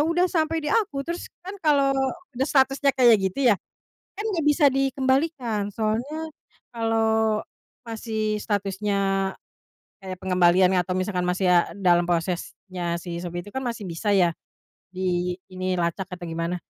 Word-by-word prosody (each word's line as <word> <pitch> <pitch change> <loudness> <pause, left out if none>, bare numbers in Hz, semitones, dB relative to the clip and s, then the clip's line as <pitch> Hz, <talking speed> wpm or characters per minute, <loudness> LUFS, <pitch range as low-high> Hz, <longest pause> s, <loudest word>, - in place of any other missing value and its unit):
udah 335 +4 +2
sampai 320 -2 0
di 295 - 0
aku 410 -11 0
terus 340 +2 -5 0.2
kan 380 - -6
kalau 280 -3 +3 0.4
udah 260 +2 0
statusnya 270 +1 +3
kayak 240 -5 +6
gitu 210 +6 +2
ya, - - +3 0.6
kan 420 - -5
nggak 335 -7 -1
bisa 295 0 +5
dikembalikan, 265 -5 0
soalnya 240 +9 -2 0.4
kalau 220 -2 +1 0.4
masih 220 -2 -2
statusnya 195 -1 -1 0.7
kayak 185 -1 -6
pengembalian 180 0 +3
atau 185 0 0
misalkan 185 0 -1
masih 180 +2 0
a 175 -1 +4
dalam 175 -2 +3
prosesnya 175 0 -2
si 170 0 -6
Shopee 175 0 -5
itu 205 - -12
kan 265 - -2
masih 235 -5 -4
bisa 175 +4 -3
ya 180 -4 +4 0.6
di 180 -1 -1 0.2
ini, 185 0 -2
lacak 175 +2 -1
atau 175 - -11
gimana. 165 +1 -3
210 Hz, 145 wpm, -24 LUFS, 180-265 Hz, 0.7 s, kayak